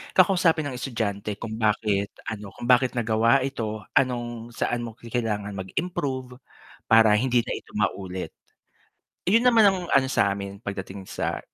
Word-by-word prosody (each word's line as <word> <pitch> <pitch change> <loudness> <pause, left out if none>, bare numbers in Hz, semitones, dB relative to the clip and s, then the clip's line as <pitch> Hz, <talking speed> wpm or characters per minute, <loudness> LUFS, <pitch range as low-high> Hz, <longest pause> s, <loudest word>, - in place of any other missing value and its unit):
kakausapin 175 -4 +4
ang 130 -3 -4
estudyante 105 -5 -3
kung 110 +2 -6
bakit 105 -2 +1 0.2
ano, 105 -2 -8
kung - - -10
bakit 125 0 +4
nagawa 115 +3 +3
ito, 110 -5 -4 0.2
anong 120 -2 -3
saan 120 - -1
mo 110 - -10
kailangan 110 -4 -3
mag-improve 130 - -4 0.5
para 110 -1 +6
hindi 125 -2 +2
na - - -6
ito - - -7
maulit. 95 -1 -2 0.9
Yun 230 +7 +4
naman 230 -3 +6
ang 190 - -1
ano 135 -1 +3
samin 100 0 0
pagdating 95 -2 -6
sa - - -3
115 Hz, 140 wpm, -25 LUFS, 105-130 Hz, 0.9 s, para